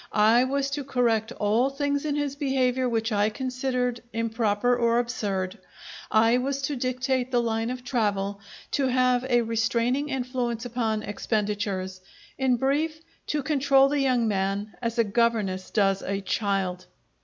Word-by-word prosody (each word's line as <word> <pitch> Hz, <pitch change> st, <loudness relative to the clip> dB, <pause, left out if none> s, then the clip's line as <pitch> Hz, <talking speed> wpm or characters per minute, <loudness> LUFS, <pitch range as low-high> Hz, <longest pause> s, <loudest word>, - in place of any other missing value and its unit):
I 225 Hz, +4 st, +5 dB
was 275 Hz, +1 st, -1 dB
to 285 Hz, 0 st, -2 dB
correct 235 Hz, -5 st, +1 dB
all 220 Hz, +5 st, +1 dB
things 285 Hz, +1 st, -1 dB
in 295 Hz, -1 st, 0 dB
his 290 Hz, -2 st, -2 dB
behaviour 260 Hz, -3 st, +1 dB
which 225 Hz, 0 st, -1 dB
I 205 Hz, 0 st, +2 dB
considered 250 Hz, 0 st, -2 dB
improper 225 Hz, +1 st, +1 dB
or 235 Hz, -1 st, +2 dB
absurd. 205 Hz, -5 st, -2 dB, 0.5 s
I 225 Hz, +3 st, +4 dB
was 275 Hz, +2 st, -2 dB
to 285 Hz, +1 st, -1 dB
dictate 255 Hz, 0 st, -1 dB
the 245 Hz, -2 st, +2 dB
line 225 Hz, -1 st, -1 dB
of 250 Hz, 0 st, -5 dB
travel, 205 Hz, -5 st, -1 dB, 0.3 s
to 275 Hz, -2 st, +1 dB
have 255 Hz, -1 st, +2 dB
a 240 Hz, -2 st, +2 dB
restraining 235 Hz, +5 st, 0 dB
influence 250 Hz, -3 st, -2 dB
upon 225 Hz, -3 st, -1 dB
expenditures; 205 Hz, -3 st, -2 dB, 0.3 s
in 260 Hz, -2 st, +2 dB
brief, 300 Hz, +5 st, 0 dB, 0.3 s
to 295 Hz, -2 st, -1 dB
control 275 Hz, -1 st, +4 dB
the 290 Hz, 0 st, 0 dB
young 255 Hz, -4 st, +2 dB
man 200 Hz, +1 st, -1 dB
as 230 Hz, 0 st, -2 dB
a 230 Hz, -, +5 dB
governess 205 Hz, -4 st, 0 dB
does 195 Hz, -2 st, +2 dB
a 195 Hz, +1 st, -2 dB
child. 190 Hz, -2 st, -1 dB
240 Hz, 150 wpm, -26 LUFS, 215-260 Hz, 0.5 s, I